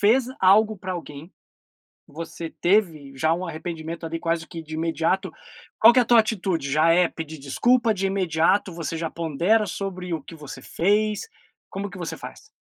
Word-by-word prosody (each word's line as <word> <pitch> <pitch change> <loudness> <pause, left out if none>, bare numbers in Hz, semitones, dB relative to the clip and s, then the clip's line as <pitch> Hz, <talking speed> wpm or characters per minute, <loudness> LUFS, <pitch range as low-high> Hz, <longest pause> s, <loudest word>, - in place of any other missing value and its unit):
fez 230 +6 +4 0.2
algo 210 +3 +5
pra 185 - -6
alguém, 160 -1 -8 0.8
você 165 +1 -7
teve 165 -8 0
já 160 +4 +2
um 180 +2 -4
arrependimento, 165 0 -6
ali, 165 0 -4
quase 165 -1 -1
que 165 -1 -8
de 155 0 -9
imediato. 165 +4 0 0.5
Qual 230 +2 +9
que - - +5
é - - +6
a - - -2
tua 235 0 +6
atitude, 190 -9 -2
já 155 +3 +4
é 175 0 +4
pedir 160 -1 -7
desculpa 230 - +2
de 195 0 -1
imediato, 190 0 +1
você 165 -1 -4
já 165 -1 -3
pondera 170 +7 +1
sobre 185 -3 -5
o 155 - -4
que 165 - -11
você 145 -3 -9
fez? 210 - 0 0.4
Como 200 +1 -5
que 200 - -10
você 175 -2 -5
faz? - - -10
170 Hz, 180 wpm, -24 LUFS, 160-200 Hz, 0.8 s, Qual